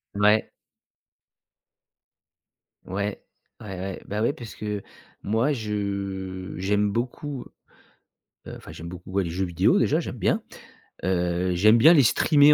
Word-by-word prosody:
Ouais. 105 +1 +4 2.4
Ouais, 100 +2 -3 0.4
ouais, 95 -4 -7
ouais, 95 0 -5
bah 105 +1 -2
ouais, 120 - +2
parce 115 -3 -9
que 105 -2 -4 0.4
moi 115 +8 +1
je 100 -4 -3
j'aime 100 +2 +1
beaucoup, 125 +4 -3 1.0
heu, - - -7
enfin - - -12
j'aime 85 +1 -8
beaucoup, 90 +1 -10
ouais, 95 0 +1
les 85 - -4
jeux 95 +3 -1
vidéo 85 -2 +3
déjà, - - +3
j'aime - - -5
bien, - - +1 0.6
heu, 90 0 +1
j'aime 110 +5 +6
bien 155 +8 +8
aller 155 -5 +7
streamer 145 +5 +6
100 Hz, 135 wpm, -25 LUFS, 95-110 Hz, 2.4 s, bien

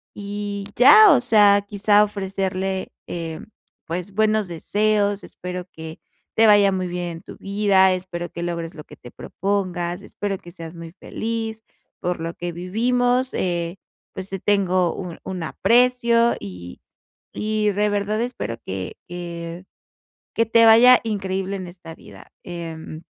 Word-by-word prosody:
y 205 0 -5
ya. 420 - +8
O 255 - +3
sea, 205 -4 +5
quizá, 205 0 +4
ofrecerle, 190 -2 -3 0.2
eh, 165 -2 -5 0.5
pues 180 +4 -4
buenos 215 -1 +2
deseos: 205 +4 0
"Espero 180 0 -7
que 160 0 -9 0.4
te 225 - +6
vaya 205 -2 +6
muy 185 -1 -2
bien 175 0 -4
en 165 -1 -8
tu - - -11
vida. 195 -2 +3
Espero 180 -1 -5
que 170 - -6
logres 170 -1 -4
lo 150 - -9
que - - -14
te 120 - -12
propongas. 185 -2 -3
Espero 200 -1 -4
que 175 - -13
seas 165 -1 -9
muy 165 -1 -9
feliz. 225 +2 -5 0.4
Por 180 -1 -2
lo 165 +1 -4
que 175 0 -4
vivimos, 245 +8 0
eh, 175 0 -2 0.4
pues 190 0 -6
te 195 - -4
tengo 185 -3 +2
un 180 -3 -7
un 185 -3 -5
aprecio. 235 +4 +3
Y 90 -3 -9 0.5
y 215 0 0
de 210 +1 +1
verdad, 205 +1 -1
espero 235 - -4
que 95 -1 -5
que 170 0 -7 0.7
que 230 - +2
te 230 +1 +5
vaya 240 +3 +8
increíble 195 -2 -2
en 185 -1 -6
esta 175 -2 -11
vida". - - -15
Em, 165 -2 -7
190 Hz, 150 wpm, -22 LUFS, 175-210 Hz, 0.7 s, ya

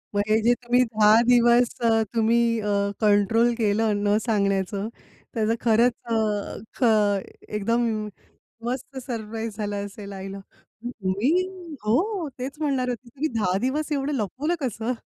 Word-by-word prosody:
मग 205 - +3
हे 220 +1 +4
जे 240 +2 +4
तुम्ही 245 +1 +3
10 220 0 +5
दिवस 240 0 +5
अ, 225 -1 +3
तुम्ही 230 0 +2
अ, 210 - -5 0.4
कंट्रोल 215 +3 +3
केलं 215 0 +1
न 205 +1 +3
सांगण्याचं, 200 -1 0 0.5
त्याचं 225 0 +1
खरंच 235 +2 +4
अ, 230 - -3 0.7
ख - - 0 0.7
एकदम 230 +3 +1 0.8
मस्त 255 +2 -4
सरप्राईज 225 -2 -5
झाला 205 -1 -3
असेल 200 0 -9
आईला. 195 0 -7 0.7
मी 200 +9 +1 0.5
हो. 340 - +1
तेच 265 +3 -5
म्हणणार 270 -4 0
होती 245 0 -5
तुम्ही 285 +6 -3
10 185 -3 +1
दिवस 295 +6 -1
एवढं 280 +1 -1
लपवलं 265 - -1
कसं? 240 -1 -2
230 Hz, 135 wpm, -24 LUFS, 210-250 Hz, 0.8 s, 10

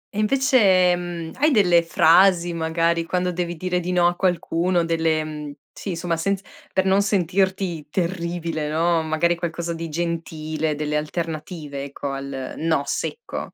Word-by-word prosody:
e - - -1
invece, 210 -7 +4
mhmm, 175 -2 -5
hai 300 +2 +4
delle 180 - +4
frasi 175 +1 +4
magari 165 +1 0
quando 180 +1 -1
devi 175 0 -3
dire 180 +1 -1
di 180 +1 -3
no 175 -1 +3
a 175 0 +3
qualcuno? 175 -1 +1
Delle 155 -3 -1 0.2
sì 190 -4 -5
somma, 170 -1 -2
senz 195 +3 -1 0.3
per 190 0 +1
non 195 +1 +4
sentirti 190 -4 0
terribile, 170 -2 -2
no, 165 +1 +2
magari 160 +2 +1
qualcosa 170 0 -3
di 165 0 -5
gentile, 160 -1 -2
delle 150 0 -1
alternative 155 -2 -4
ecco 140 0 -5
al 135 -1 -5
"no" 160 -3 +1
secco? 465 - -4
170 Hz, 145 wpm, -23 LUFS, 160-180 Hz, 0.3 s, invece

